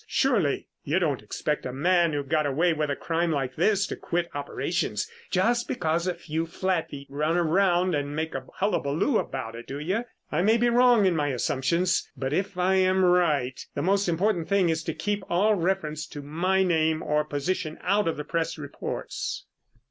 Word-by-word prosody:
"Surely. 215 - +1 0.2
You 155 +6 0
don't 155 -8 0
expect 150 +7 -2
a 125 - -4
man 170 +5 +2
who 145 -1 -1
got 150 +2 +1
away 165 +5 +2
with 150 -1 -1
a 140 - 0
crime 165 +2 -1
like 135 -4 -2
this 200 +4 +2
to - - -4
quit 170 0 -2
operations 140 - -2 0.2
just 235 +6 +1
because 170 -3 -1
a 180 - 0
few 160 +1 -3
flatfeet 165 -6 -2
run 150 +4 0
around 180 +1 +2
and 145 -1 -2
make 160 +1 -2
a 130 -1 -5
hullabaloo 195 - +1
about 130 -4 -4
it, 115 +1 -9
do 135 - -5
you? 190 +11 -1 0.3
I 155 - +1
may 220 +5 +4
be 240 +1 +3
wrong 240 -3 +5
in 185 -3 +3
my 150 -2 +1
assumption, 135 +6 0 0.3
but 135 +1 -2
if 190 +2 -1
I 185 +1 +3
am 185 0 +3
right, 155 -8 +2
the - - -1
most 195 +1 +2
important 175 0 0
thing 195 -3 +3
is 160 0 0
to - - -3
keep 205 -1 -2
all 200 +5 +3
reference 165 -5 -1
to 145 -1 -8
my 180 +6 +1
name 160 -3 +1
or 150 0 +1
position 155 +2 -2
out 200 +1 +2
of 165 - -1
the 150 - -4
press 165 -1 -2
reports." 145 -2 -5
165 Hz, 190 wpm, -26 LUFS, 150-190 Hz, 0.3 s, wrong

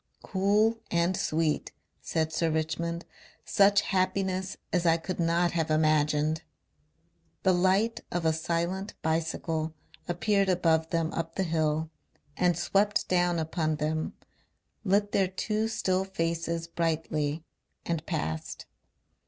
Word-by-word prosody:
"Cool 210 +4 +2
and 170 +2 +2
sweet," 155 -2 0 0.3
said 160 -1 -1
Sir 165 +1 +1
Richmond. 165 +2 -2 0.4
"Such 200 0 +5
happiness 185 -1 -1 0.2
as 180 -2 +2
I 165 0 +5
could 175 +3 -5
not 170 +1 +2
have 160 -2 -1
imagined." 155 0 +2 1.0
The 190 - +4
light 190 +6 +2
of 175 -1 -1
a 160 - +4
silent 170 +5 -2
bicycle 160 0 -1 0.3
appeared 195 +3 +1
above 165 -3 +2
them 165 -1 0
up 165 0 -3
the 190 - +1
hill 160 -2 0 0.4
and 175 -2 +2
swept 205 +4 +1
down 175 -1 +2
upon 160 -1 -1
them, 155 +1 -2 0.7
lit 205 0 +2
their 190 - +3
two 215 +4 -1
still 190 -4 0
faces 165 -3 -2
brightly 160 -2 -1 0.4
and 165 -2 -1
passed. 80 +1 -3
170 Hz, 120 wpm, -28 LUFS, 160-190 Hz, 1.0 s, Such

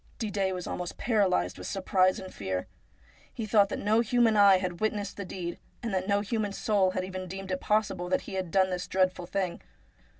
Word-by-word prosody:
Didet 200 -4 -1
was 180 - -5
almost 180 -1 -5
paralysed 185 - +1
with 90 - -6
surprise 185 -1 +2
and 185 - -9
fear. 95 -2 -3 0.7
He 225 - -5
thought 205 -1 +4
that - - -3
no 215 +2 +2
human 235 -1 +3
eye 200 -2 +7
had 180 -2 -3
witnessed 210 -2 -1
the 200 - -5
deed, 175 -2 -5 0.2
and 230 -4 -2
that 185 0 -1
no 200 0 +2
human 210 -1 -2
soul 200 -2 +2
had 185 0 -2
even 185 0 -6
deemed 190 +1 -6
it 185 - -2
possible 195 -4 0
that - - +1
he - - -9
had 190 -2 -2
done 190 +2 +3
this 180 0 -3
dreadful 185 -2 +1
thing. 185 -2 -2
190 Hz, 205 wpm, -29 LUFS, 185-205 Hz, 0.7 s, eye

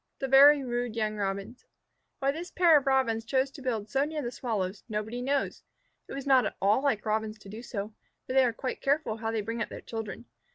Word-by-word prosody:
THE 270 - -3
VERY 280 +2 +7
RUDE 240 -2 -2
YOUNG 215 -1 -1
ROBINS 200 +4 -4 0.5
Why 275 -1 +1
this 335 +5 -6
pair 345 -3 +5
of 280 -2 +3
Robins 260 -4 +2
chose 260 +3 0
to 280 - -11
build 225 -5 -2
so 270 +6 +1
near 300 0 -3
the 240 - -3
Sparrows, 210 -7 -3
nobody 220 +3 -3
knows. 275 +2 -1 0.5
It - - -8
was 275 0 -5
not 265 -2 +5
at - - -7
all 205 +6 +3
like 250 -7 0
Robins 215 0 -1
to 205 -2 -14
do 215 +3 -8
so, 215 -3 -5 0.3
for - - -4
they 265 0 +6
are 245 - +2
quite 255 +3 -5
careful 280 -5 0
how 225 0 -3
they 225 -1 -1
bring 230 +3 -4
up - - -2
their - - -7
children. 225 -1 -6
240 Hz, 230 wpm, -29 LUFS, 215-270 Hz, 0.5 s, VERY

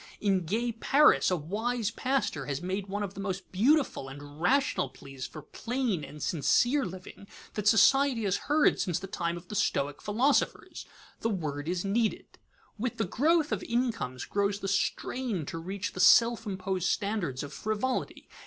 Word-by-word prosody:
In 195 -4 +1
gay 235 +6 0
Paris, 275 +6 +4
a 180 - +2
wise 220 +8 -2
pastor 255 - -1
has 140 -1 -2
made 190 +3 -3
one 205 +2 -3
of 200 -1 -5
the - - -10
most 195 -1 -4
beautiful 240 - +2
and 145 +2 -11
rational 260 - +2
pleas 135 -1 -9
for 155 - -10
plain 230 - -2
and 150 +2 -8
sincere 240 - +2
living 185 +2 -10 0.3
that 210 -1 -2
society 240 +3 +5
has 195 -2 +1
heard 300 +1 +4
since 175 -4 0
the 190 - -6
time 170 -2 -3
of 175 +1 -12
the - - -8
stoic 145 -8 0
philosophers. 240 +8 0 0.3
The 225 - -1
word 155 -6 -3
is 180 +1 -2
needed. 220 +3 -1 0.4
With 240 +1 -2
the 225 - 0
growth 310 - +2
of - - -1
incomes 230 - -2
grows 200 0 0
the 195 - -3
strain 200 - -1
to 165 - -5
reach 190 +4 -4
the - - -7
self 230 +3 +5
imposed 185 -2 -2
standards 200 -11 -1
of 145 - -8
frivolity. 215 +4 -3
200 Hz, 170 wpm, -29 LUFS, 170-235 Hz, 0.4 s, society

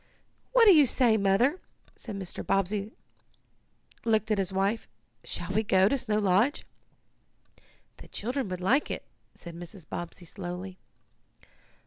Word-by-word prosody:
"What - - +6
do 405 - +9
you 300 -5 +6
say, 240 -3 +4
Mother?" 215 - +2 0.5
and 205 -3 -5
Mr. 185 -2 -6
Bobbsey 195 +2 0 1.1
looked 220 -1 +1
at 210 - +2
his 190 -1 -1
wife. 195 +4 0 0.4
"Shall 175 +1 -5
we 215 - +3
go 190 -3 +4
to 275 - +2
Snow 225 -5 -1
Lodge?" 210 +7 +2 1.3
"The - - -13
children 245 +1 -3
would 185 0 -5
like 255 +11 +2
it," - - -5 0.3
said 170 - -10
Mrs. 175 -1 -11
Bobbsey 175 +1 -7
slowly. 180 +1 -7
200 Hz, 135 wpm, -28 LUFS, 185-230 Hz, 1.3 s, do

